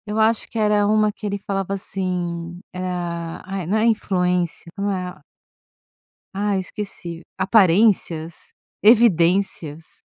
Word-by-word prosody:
Eu 210 +1 -3
acho 220 +1 +2
que - - -7
era 210 -1 +3
uma 215 0 +3
que 210 - -10
ele 200 0 -2
falava 195 -1 -3
assim: 175 -3 -3
"Ah" 175 -2 -4
ai, 190 -1 -4
não 205 +5 +1
é 215 - +2
influência, 180 -6 0
como 200 0 -1
é 180 -5 -4 1.1
ah, 200 0 0
esqueci, 185 -3 -6 0.2
aparências, 190 -4 +2 0.3
evidências. 180 -7 +3
190 Hz, 120 wpm, -22 LUFS, 175-210 Hz, 1.1 s, era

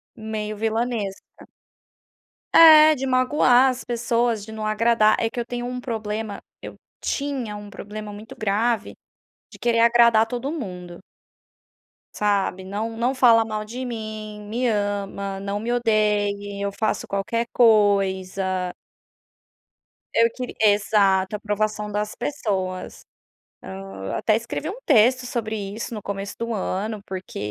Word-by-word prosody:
Meio 215 -1 -4
vilanesca. 225 -2 -3 1.1
É, 310 -1 +9
de 270 -1 -4
magoar 255 0 +4
as 255 0 -4
pessoas, 235 -2 0
de 220 - -10
não 220 -1 -5
agradar. 215 0 +3
É 225 - 0
que 240 - -6
eu 235 - -2
tenho 240 0 -4
um 250 0 -4
problema 220 -3 -4 0.2
eu - - -8 0.3
tinha 270 -7 -3
um 205 0 -9
problema 210 +1 -8
muito 215 +2 -10
grave, 220 +1 0 0.6
de - - -12
querer 235 -1 +1
agradar 235 -1 +5
todo 245 +4 -4
mundo 180 - -6 1.2
sabe, 200 -2 0
"não 220 +4 -4
não 245 +3 0
fala 230 -3 +5
mal 215 -1 -3
de 245 +4 -6
mim", 215 -3 -6
"me 245 +3 0
ama", 200 -2 -2
"não 200 +1 -3
me 235 +2 -2
odeie", 205 -3 0
"eu 200 - 0
faço 215 +2 -2
qualquer 230 +4 -2
coisa". 190 -4 +2 1.4
Eu 230 0 +4
queri 250 -1 -6
exato, 205 -2 +3
aprovação 210 0 -2
das 210 +1 -3
pessoas. 190 -10 -3 0.6
Ah, 95 0 -6
até 215 - +2
escrevi 235 +7 -4
um 415 +6 -7
texto 255 -1 +4
sobre 225 -3 -3
isso 210 +3 -5
no 215 - -5
começo 200 0 -5
do 230 0 -2
ano, 210 +1 -3
porque 190 -1 -7
215 Hz, 135 wpm, -23 LUFS, 200-235 Hz, 1.4 s, É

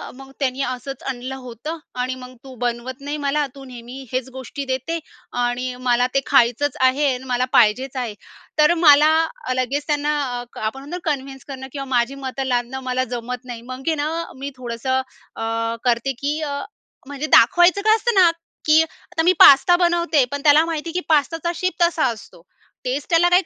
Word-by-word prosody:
मग 270 0 -12
त्यांनी 265 -1 -1
असंच 255 +1 -6
आणलं 255 +1 -5
होतं 255 +8 -6 0.2
आणि 255 +1 -2
मग, 255 0 -11
तू 265 -1 -11
बनवत 245 +3 -4
नाही 290 +2 -4
मला, 295 +1 +1
तू 275 - -11
नेहमी 250 +1 -9
हेच 255 0 -2
गोष्टी 275 +2 -6
देते 295 +6 -3 0.4
आणि 250 +1 -2
मला 245 +1 +3
ते 275 - +4
खायचंच 270 +2 +2
आहे 260 +3 +3
आणि 250 +1 -6
मला 250 -1 0
पाहिजेच 245 +4 +3
आहे. 245 -4 -3 0.5
तर 300 +2 +6
मला, 300 0 +7 0.4
लगेच 270 +4 -1
त्यांना 295 0 0 0.2
अ, - - -7 0.2
आपण 220 +5 -3
म्हणतो 290 +6 -6
ना 325 - -2
कन्विन्स 270 -1 -6
करणं 265 -1 -7
किंवा 275 -1 -5
माझी 240 +3 +1
मतं 265 +1 -3
लादणं 245 +1 -1
मला 255 0 +1
जमत 245 +1 -6
नाही. 240 -2 -7
मग 255 +2 -8
आहे 320 - +2
ना, 295 +1 -1 0.3
मी 275 +2 -5
थोडंसं 255 +2 -2 0.3
अ, - - -7 0.4
करते 240 +2 +1
की 295 +2 0
अ, 285 -2 -3 0.5
म्हणजे 285 +1 -4
दाखवायचं 350 +10 +5
काय 435 +1 +5
असतं 475 +2 0
ना, 355 -3 +6 0.3
की 310 +1 +6
आता 325 +1 -5
मी 355 - +5
पास्ता 285 +6 +8
बनवते, 345 -4 +2
पण, 285 - -3
त्याला 300 +1 +6
माहिती 330 0 -4
आहे 330 - -7
की 360 - 0
पास्ताचा 325 +3 +1
शेप 370 +2 -1
तसा 340 -3 +3
असतो. 225 -7 -7 0.4
टेस्ट 270 +6 -3
त्याला, 345 +1 +4
काही 360 +2 +4
270 Hz, 185 wpm, -21 LUFS, 250-305 Hz, 0.5 s, पास्ता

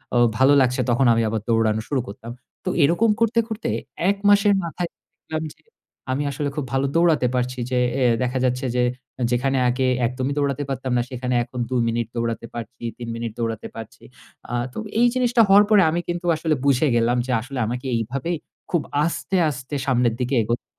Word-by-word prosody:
ও - - +4 0.2
ভালো 135 +2 +5
লাগছে 125 0 +2
তখন 120 +2 +3
আমি 115 - +2
আবার 110 -1 -2
দৌড়ানো 110 -1 +2
শুরু 140 -3 +1
করতাম। 110 +3 -8 0.3
তো - - 0
এরকম 175 +10 +3
করতে, 230 0 +2
করতে 220 -1 -4 0.4
১ 200 - +1
মাসের 205 0 +5
মাথায় 170 +1 -4 0.3
দেখলাম 160 0 -5
যে 155 - -32 0.5
আমি 135 +3 0
আসলে 140 +1 -2
খুব 150 - -2
ভালো 135 +1 +1
দৌড়াতে 165 -6 +3
পারছি, 125 0 -1
যে 125 - +1 0.2
এ - - +3 0.2
দেখা 125 +1 -1
যাচ্ছে 125 +1 0
যে 125 - +3 0.5
যেখানে 135 +2 +1
আগে 130 +1 0 0.2
একদমই 130 +3 -2
দৌড়াতে 140 0 0
পারতাম 130 -1 -3
না। - - +3
সেখানে 125 -1 -3
এখন 125 +1 -8
২ 130 - -2
মিনিট 115 -1 -1
দৌড়াতে 115 0 -2
পারছি, 120 +1 -8
৩ 120 - -7
মিনিট 115 -1 -4
দৌড়াতে 115 -2 -3
পারছি। 115 -1 -10 0.5
আ - - -4 0.2
তো - - -10 0.2
এই 245 - +6
জিনিসটা 245 -2 +3
হওয়ার 200 +2 +7
পরে 210 -3 +6
আমি 170 +2 0
কিন্তু 175 +1 -3
আসলে 155 -1 0
বুঝে 140 +2 +3
গেলাম 120 +1 +2
যে 130 - -3
আসলে 130 +2 -6
আমাকে 125 +4 -4
এইভাবেই 130 +9 -2 0.4
খুব 170 -4 +2 0.2
আস্তে, 170 +3 -2
আস্তে 130 +1 -6
সামনের 125 -3 +2
দিকে 125 +2 0
এগোতে 120 +3 -2
130 Hz, 190 wpm, -22 LUFS, 120-160 Hz, 0.5 s, হওয়ার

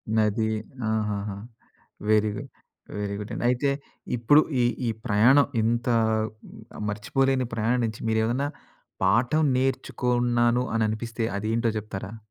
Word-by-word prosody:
నది 110 0 +2 0.4
ఆహాహా! 105 -2 -2 0.7
వెరీ 110 0 +4
గు - - -4 0.6
వెరీ 100 -1 -2
గుడ్డండి. 105 +3 -5
అయితే 125 +3 +1 0.5
ఇప్పుడు 145 +7 +5 0.2
ఈ 120 - +4 0.2
ఈ - - +2 0.2
ప్రయాణం 125 +6 +5
ఇంత 115 +2 0 1.0
మర్చిపోలేని 130 +5 +1
ప్రయానించి 115 0 0
మీరేమన్నా 115 +5 +1 0.6
పాఠం 120 +11 +3
నేర్చుకున్నాను 125 -2 +1
అని 110 -1 +2
అనిపిస్తే 115 +1 -3
అది 110 +2 -3
ఏంటో 115 -1 +1
చెప్తారా? 105 +1 -7
115 Hz, 105 wpm, -26 LUFS, 110-125 Hz, 1.0 s, ఇప్పుడు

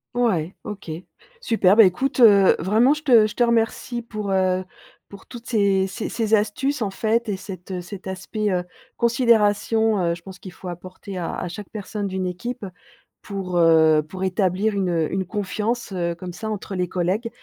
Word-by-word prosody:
Ouais, 195 -9 0
OK. 205 -4 -8 0.5
Super. 205 - +3
Bah, 225 - +9
écoute, 255 +9 +1
heu, 200 -5 +7
vraiment, 220 - +3
je 305 - -9
te 235 -7 +6
je 210 - -9
te 245 - +3
remercie 235 +1 0
pour, 215 -4 -5
heu, 185 -1 +1 0.4
pour 200 -1 -14
toutes 240 -1 -10
ces 200 -4 +2
ces 185 - -5
ces 225 -2 -2
astuces, 230 +6 +1
en 205 - 0
fait, 225 +3 0
et 195 - -1
cet, 185 -1 -9
heu, 180 -1 -3
cet 190 +2 -9
aspect, 205 +3 -3
heu, 180 -1 0 0.3
considération. 225 -2 +2
Heu, 170 0 +1
je 170 - -15
pense 190 -1 -11
qu'il 185 - -10
faut 180 - -11
apporter 185 +2 -8
à 170 - -3
à 180 - -4
chaque 185 +3 -8
personne 205 -1 -5
d'une 190 0 -3
équipe, 200 +6 -5 0.6
pour, 190 -3 -4
heu, 160 -2 +5
pour 190 +3 -6
établir 190 +2 +1
une, 190 -2 0
heu, 165 -3 0
une 190 0 -1
confiance, 210 +4 -2
heu, 170 -2 -2
comme 175 +1 -8
ça, 220 +5 -5
entre 205 -1 -5
les 180 -1 -1
collègues. 190 +6 -1
200 Hz, 190 wpm, -22 LUFS, 185-225 Hz, 0.6 s, Bah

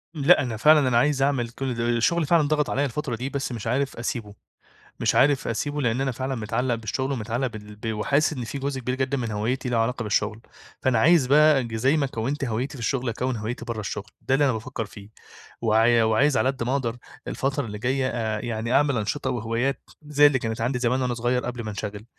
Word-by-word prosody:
لأ، 140 -1 +5
أنا 120 -5 -3
فعلًا 150 +2 +5
أنا 120 - +3
عايِز 140 +2 +2
أعمل 135 -4 +1
كل 130 +1 -4
ده 115 0 -1
الشغل 150 +8 +2
فعلًا 160 -1 +3
ضاغط 150 -1 +1
عليّا 145 - +1
الفترة 140 -1 -3
دي، 125 +4 -4
بس 140 -2 -3
مش 115 -2 -5
عارِف 135 +3 -1
أسيبه، 115 -3 -4 0.7
مش - - +1
عارِف 140 0 +3
أسيبه، 145 +6 -2
لإن 120 +1 0
أنا 135 -1 0
فعلًا 130 +2 -3
متعلّق 115 +2 -1
بالشغل، 125 +5 -3
ومتعلّق 120 +1 -2
بال 105 -3 -10
ب 110 +1 -4
وحاسس 140 +9 +1
إن 125 -5 -5
في 115 +5 -5
جزء 135 -1 -2
كبير 125 +1 -2
جدًا 135 +1 -1
من 115 -3 -3
هويَّتي 120 +5 -2
له 120 - +1
علاقة 115 +2 0
بالشغل. 105 +1 -1 0.4
فأنا 125 -4 +2
عايِز 155 0 +5
بقى، 150 0 +5
ج 115 -1 -5
زي 130 +7 +2
ما 140 - +1
كوَّنت 135 +4 -3
هويَّتي 125 +4 -2
في - - -10
الشغل، 125 +1 -1
أكوِّن 125 +3 -2
هويَّتي 110 +2 -5
برَّا 115 -2 -4
الشغل. 105 0 -5
ده 130 - -1
اللي 145 +2 +4
أنا 130 - +2
بافكِّر 115 +1 -4
فيه، 105 0 -13 0.5
وع 115 +1 +4
وعايِز 130 +6 +3
على 130 - +2
قد 130 -3 -3
ما 120 - -1
أقدر، 120 -4 -1 0.3
الفترة 135 0 -1
اللي 105 -2 -6
جاية، 130 +2 0
آآ، 110 -4 -2
يعني 115 +1 -3
أعمل 140 -3 +3
أنشطة 130 +6 -2
وهوايات، 120 +3 -1 0.2
زي 145 0 +6
اللي 140 -2 +1
كانت 115 0 -3
عندي 125 +1 0
زمان 125 +2 +1
وأنا 125 -1 0
صغير 120 +2 0
قبل 120 -1 -4
ما 110 - -5
انشغَل. 105 +1 -6
125 Hz, 225 wpm, -25 LUFS, 115-135 Hz, 0.7 s, زي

